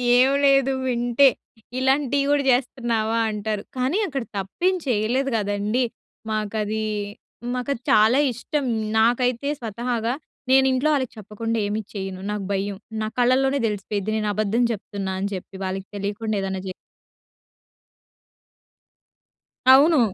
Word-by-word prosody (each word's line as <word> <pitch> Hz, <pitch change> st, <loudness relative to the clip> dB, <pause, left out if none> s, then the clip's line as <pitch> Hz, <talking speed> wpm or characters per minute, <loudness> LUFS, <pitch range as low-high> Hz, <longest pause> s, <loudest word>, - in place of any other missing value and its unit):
ఏమి 265 Hz, +3 st, +5 dB
లేదు 275 Hz, -1 st, +4 dB
వింటే 245 Hz, +2 st, +4 dB, 0.5 s
ఇలాంటివి 275 Hz, +1 st, +2 dB
కూడా 290 Hz, -1 st, +3 dB
చేస్తున్నావా 235 Hz, -3 st, 0 dB
అంటారు. 210 Hz, -1 st, -3 dB
కానీ 260 Hz, +8 st, +1 dB
అక్కడ 275 Hz, -6 st, -3 dB
తప్పేమి 355 Hz, -, 0 dB
చేయలేదు 245 Hz, +4 st, +1 dB
గదండీ! 205 Hz, +4 st, 0 dB, 0.5 s
మాకది, 215 Hz, 0 st, -2 dB, 0.7 s
మాకది 250 Hz, 0 st, -2 dB
చాలా 220 Hz, +5 st, +5 dB
ఇష్టం. 275 Hz, +5 st, -3 dB, 0.3 s
నాకైతే 245 Hz, +3 st, +2 dB
స్వతహాగా 235 Hz, +1 st, -2 dB, 0.4 s
నేను 265 Hz, 0 st, +6 dB
ఇంట్లో 260 Hz, +4 st, +1 dB
వాళ్ళకి 260 Hz, -5 st, -1 dB
చెప్పకుండా 215 Hz, +2 st, -4 dB
ఏమి 210 Hz, +2 st, -2 dB
చేయను. 190 Hz, -2 st, -5 dB
నాకు 210 Hz, -2 st, -3 dB
భయం. 195 Hz, 0 st, -2 dB, 0.3 s
నా -, -, -1 dB
కళ్ళలోనే 265 Hz, +3 st, +3 dB
తెలిసిపోయిద్ది 205 Hz, 0 st, -3 dB
నేను 215 Hz, -1 st, -1 dB
అబద్ధం 215 Hz, +3 st, +1 dB
చెప్తున్నా 200 Hz, -2 st, -5 dB
అని 200 Hz, -, -1 dB
చెప్పి 190 Hz, +1 st, -8 dB
వాళ్ళకి 190 Hz, +1 st, -4 dB
తెలియకుండా 205 Hz, +2 st, -2 dB
ఏదైనా 190 Hz, -1 st, -3 dB
జే 185 Hz, -, -4 dB, 3.0 s
అవును. 300 Hz, +3 st, +6 dB
230 Hz, 115 wpm, -23 LUFS, 205-260 Hz, 3.0 s, నేను